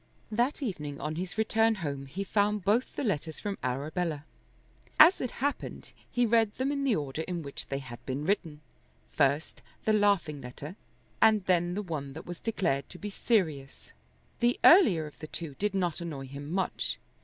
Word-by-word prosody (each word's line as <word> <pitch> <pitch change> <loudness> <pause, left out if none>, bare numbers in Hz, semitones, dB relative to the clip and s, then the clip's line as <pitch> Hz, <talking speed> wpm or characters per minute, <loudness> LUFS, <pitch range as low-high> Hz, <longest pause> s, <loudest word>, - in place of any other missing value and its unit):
That 245 +7 0
evening 150 - -4
on 150 +2 -3
his 180 +4 -5
return 225 +1 +3
home 140 -7 -4
he 190 +9 -4
found 205 -1 +1
both 225 +5 +2
the - - -2
letters 160 - -2
from 200 -1 -4
Arabella. 150 +4 -2 0.7
As 330 +5 +8
it 250 - -1
happened 285 +5 -3 0.2
he 245 0 +2
read 225 -2 +3
them 265 +2 0
in 280 -1 -1
the 260 -5 +3
order 145 0 -3
in 170 0 -4
which 140 -1 -7
they 135 - -2
had 120 -3 -9
been 135 +3 -2
written, 165 -6 -1 0.5
first 145 +2 +1 0.2
the 220 - +3
laughing 200 -8 +2
letter, 140 +7 -8 0.5
and 215 -3 +5
then 175 -1 +2
the 210 - -2
one 145 -6 -5
that 160 - -9
was 175 -1 -7
declared 170 - -1
to 180 - -10
be 205 +2 -6
serious. 160 - -1 0.5
The 240 +1 +2
earlier 210 - +7
of 150 - -12
the 155 - -7
two 160 -2 -6
did 205 -1 0
not 175 -3 0
annoy 150 -6 -5
him 140 +3 -8
much. 190 +1 -1
175 Hz, 180 wpm, -29 LUFS, 145-210 Hz, 0.7 s, As